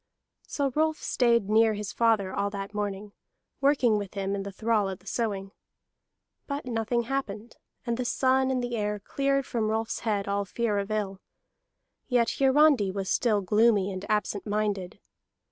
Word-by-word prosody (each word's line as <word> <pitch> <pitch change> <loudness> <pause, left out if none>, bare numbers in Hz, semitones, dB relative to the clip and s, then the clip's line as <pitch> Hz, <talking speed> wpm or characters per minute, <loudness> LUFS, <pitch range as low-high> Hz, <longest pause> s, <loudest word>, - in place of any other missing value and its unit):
So 280 -2 -1
Rolf 315 +2 +1
stayed 235 -5 +2
near 220 +1 +4
his 205 -1 -5
father 220 -5 +2
all 200 0 0
that 200 0 -6
morning, 205 0 -4 0.5
working 265 -6 +3
with 200 0 -7
him 195 0 -2
and 200 -1 -2
the 200 - -6
thrall 215 0 0
at 190 - -6
the 190 - -25
sowing. 200 -4 -2 1.0
But 280 0 -4
nothing 235 0 -1
happened; 230 -4 -4 0.3
and 235 -1 -1
the 250 - -1
sun 260 +1 +2
and 255 -2 0
the 240 -1 -2
air 210 -1 -1
cleared 275 +5 0
from 225 -5 -1
Rolf's 220 +1 -1
head 205 -3 -1
all 200 0 0
fear 210 +1 -1
of 200 +1 -4
ill. 200 -3 -2 0.9
Yet 240 -2 +1
Hiarandi 270 -5 +4
was 190 0 -3
still 215 -4 +2
gloomy 210 0 +3
and 185 0 -6
absent 210 -1 -1
minded. 205 -3 -2
215 Hz, 165 wpm, -27 LUFS, 200-245 Hz, 1.0 s, near